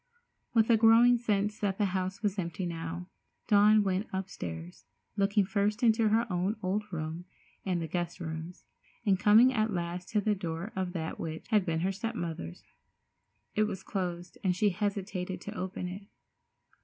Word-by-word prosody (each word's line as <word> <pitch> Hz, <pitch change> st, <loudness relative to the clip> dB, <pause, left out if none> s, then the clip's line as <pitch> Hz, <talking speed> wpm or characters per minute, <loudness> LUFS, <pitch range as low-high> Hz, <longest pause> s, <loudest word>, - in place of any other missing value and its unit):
With 225 Hz, +1 st, +5 dB
a 225 Hz, -, +6 dB
growing 230 Hz, +2 st, +6 dB
sense 210 Hz, -2 st, 0 dB
that 195 Hz, -2 st, 0 dB
the 210 Hz, -, +2 dB
house 190 Hz, +3 st, -2 dB
was 205 Hz, -1 st, 0 dB
empty 170 Hz, +1 st, -3 dB
now, 170 Hz, +1 st, -4 dB, 0.4 s
Dawn 210 Hz, 0 st, +6 dB
went 195 Hz, +1 st, 0 dB
upstairs, 90 Hz, -, -6 dB, 0.3 s
looking 200 Hz, 0 st, +2 dB
first 205 Hz, +3 st, 0 dB
into 225 Hz, -1 st, +4 dB
her 225 Hz, +2 st, +3 dB
own 185 Hz, +4 st, 0 dB
old 205 Hz, +3 st, -1 dB
room 160 Hz, +1 st, -4 dB, 0.4 s
and 180 Hz, -2 st, +1 dB
the 165 Hz, -, -3 dB
guest 175 Hz, 0 st, -3 dB
rooms, 160 Hz, +1 st, -6 dB, 0.4 s
and 195 Hz, -3 st, +3 dB
coming 220 Hz, +5 st, +6 dB
at 220 Hz, -2 st, +1 dB
last 175 Hz, 0 st, -3 dB
to 215 Hz, -, +2 dB
the 210 Hz, +1 st, +1 dB
door 175 Hz, +1 st, -4 dB
of 185 Hz, -1 st, -2 dB
that 160 Hz, -3 st, -4 dB
which 160 Hz, -1 st, -5 dB
had 210 Hz, -4 st, +3 dB
been 160 Hz, -1 st, 0 dB
her 190 Hz, +2 st, +1 dB
step 225 Hz, +4 st, -4 dB
mother's. 160 Hz, -, -5 dB, 0.9 s
It 215 Hz, -, +3 dB
was 195 Hz, -3 st, -5 dB
closed, 175 Hz, -2 st, -4 dB
and 185 Hz, -2 st, +2 dB
she 205 Hz, +2 st, +3 dB
hesitated 190 Hz, -1 st, -3 dB
to 205 Hz, -, -7 dB
open 185 Hz, -1 st, -4 dB
it. 195 Hz, +3 st, -8 dB
190 Hz, 170 wpm, -30 LUFS, 175-210 Hz, 0.9 s, a